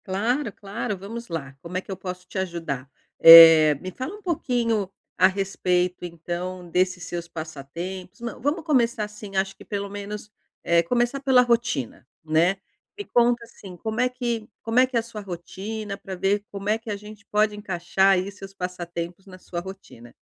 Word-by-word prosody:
Claro, 220 +7 0
claro, 200 +1 -5
vamos 230 +5 -7
lá, 140 -5 -5
como 175 +2 -5
é - - -1
que 195 - -10
eu - - -2
posso 180 0 -7
te 190 - -4
ajudar? 165 -8 -4 0.3
Eh, 165 -2 +11
me 185 - -6
fala 260 - -6
um 420 - -14
pouquinho 235 - 0 0.3
a 185 - +6
respeito 185 -2 0
então 175 +1 -5
desses 180 0 +1
seus 170 0 -5
passatempos, 170 +4 -7
não, 235 0 -6
vamos 300 +5 0
começar 240 -7 +2
assim 210 -1 -8
acho 190 0 0
que - - -14
pelo 200 -1 -4
menos, 205 +1 -7 0.3
eh, 170 0 +4
começar 240 +9 0
pela 265 -2 +5
rotina, 230 - -1 0.2
né, 165 +5 +3 0.4
me 410 - -6
conta 240 0 +2
assim, 195 -5 -12
como 220 +4 -2
é 250 - +3
que 240 -3 -3
como 225 +2 +2
é 255 - +5
que 255 - -8
é - - +5
a - - -3
sua 225 -2 -8
rotina 200 +3 -6
pra 190 -1 -7
ver 200 +3 +1
como 200 0 -6
é 215 +2 +2
que 225 0 -10
a 210 - -1
gente 210 0 -12
pode 210 0 +2
encaixar 195 -1 +2
aí 190 +1 0
seus 195 -1 -11
passatempos 175 0 -5
na 185 -1 -11
sua 175 -1 -6
rotina. 175 -11 -11
195 Hz, 185 wpm, -24 LUFS, 175-225 Hz, 0.4 s, Eh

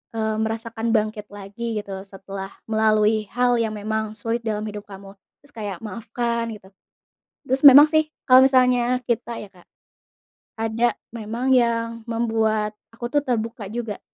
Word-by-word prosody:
eee, 220 -1 -1
merasakan 225 +1 -2
bangkit 215 -1 0
lagi 210 +3 -5
gitu, 195 -2 -7
setelah 195 0 -8 0.2
melalui 215 0 +2
hal 245 0 +2
yang 220 -1 -1
memang 220 +1 -2
sulit 230 +2 -2
dalam 215 -1 -2
hidup 210 -1 -7
kamu, 195 0 -11 0.3
terus 285 - -17
kayak 205 -5 -5
maafkan 230 +1 -3
gitu. 200 -3 -11 0.8
Terus 265 +2 0
memang 285 +2 +11
sih, 310 0 +3 0.2
kalau 260 +1 +8
misalnya 250 -1 +3
kita 235 0 -2
ya, 205 - -10
Kak, 180 -2 -22 0.9
ada 225 +1 0 0.2
memang 235 +4 -2
yang 230 -2 +1
membuat 220 -2 0 0.2
aku 240 +1 -6
tuh 290 - +3
terbuka 230 -4 -3
juga. 220 -2 -5
225 Hz, 145 wpm, -23 LUFS, 210-235 Hz, 0.9 s, memang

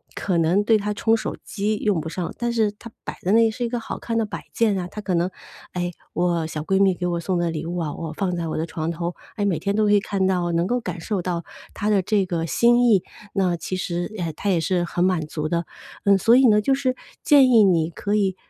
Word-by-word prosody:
可 180 -4 0
能 170 +5 +3
对 220 +1 +4
她 210 +1 -2
冲 225 +2 +2
手 225 - -3
机 210 +1 -1
用 205 -6 0
不 160 - -5
上， 175 0 -4
但 240 0 0
是 220 -3 +1
它 210 +3 -12
摆 - - -7
在 185 - 0
那， 225 0 +5
是 240 +3 -4
一 - - -2
个 240 0 -2
好 - - -6
看 230 -1 -3
的 225 - +1
摆 210 - -7
件 220 -3 +2
啊。 180 - -4
她 210 - -8
可 200 -3 -2
能， 175 +1 +1 0.4
“哎， 175 0 -2 0.2
我 170 -2 0
小 155 -1 -4
闺 190 +4 +1
蜜 190 -2 +4
给 180 - -4
我 175 -1 -1
送 180 +1 -1
的 175 -1 0
礼 160 0 -4
物 175 - -3
啊， 160 -4 -2
我 160 -2 -5
放 185 -3 -1
在 170 -1 -3
我 155 - -3
的 160 - -1
床 160 -1 -4
头。 170 +1 -3 0.2
哎， 205 - -1
每 190 -5 +1
天 200 +1 -1
都 215 0 +2
可 205 - +3
以 205 - +6
看 195 -1 -1
到， 180 -2 +1
能 170 +1 +1
够 245 +6 0
感 180 -4 -5
受 195 +2 -2
到 175 -1 -3 0.3
她 205 - -2
的 200 -2 +3
这 200 +1 +1
个 170 -2 -2
心 240 - +4
意。” 200 -5 +4 0.3
那 185 -3 +2
其 170 +3 -4
实， 175 +1 -3
哎， 170 -3 -3
她 200 - -2
也 180 - +3
是 175 +2 0
很 175 0 -1
满 185 -3 +1
足 155 -1 -3
的。 170 +1 -1 0.4
嗯， 200 -1 +6
所 230 +5 +5
以 260 0 +6
呢， 210 -1 +5
就 270 +5 +2
是 260 -2 0 0.3
建 280 -4 +6
议 225 -3 +7
你 170 -4 +2
可 205 +5 -2
以， 195 -3 +1
185 Hz, 285 characters per minute, -23 LUFS, 170-210 Hz, 0.4 s, 议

